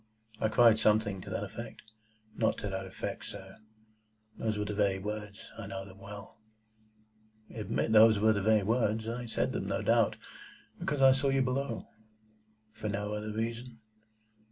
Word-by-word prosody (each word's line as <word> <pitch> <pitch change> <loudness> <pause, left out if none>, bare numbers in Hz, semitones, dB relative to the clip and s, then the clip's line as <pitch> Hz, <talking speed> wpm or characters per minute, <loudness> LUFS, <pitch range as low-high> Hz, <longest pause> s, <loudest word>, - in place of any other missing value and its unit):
"I 110 - +2
cried 110 0 +5
something 105 -3 +2
to - - -9
that - - -2
effect—" 110 - -9 0.4
"Not 110 - +1
to 105 - -4
that 95 0 -4
effect, 95 - -5
sir. - - -9 0.8
Those 110 -2 -2
were 105 - -1
the 105 - -3
very 100 -2 +2
words. 105 +1 -6
I - - -6
know 95 0 -5
them 95 0 -14
well." 105 +3 -10 1.1
"Admit 110 0 -1
those 110 0 +7
were 110 +2 +4
the 100 - -1
very 110 0 +4
words. 110 0 +1
I 120 +1 -4
said 115 - 0
them, - - -3
no - - -1
doubt, - - +3 0.6
because 145 -2 -1
I 135 - +9
saw 135 +1 +2
you 135 -1 +3
below." 130 -2 -2 0.9
"For 110 -1 -5
no 105 +1 -2
other 105 0 -4
reason?" 115 +2 -4
110 Hz, 165 wpm, -31 LUFS, 105-115 Hz, 1.1 s, I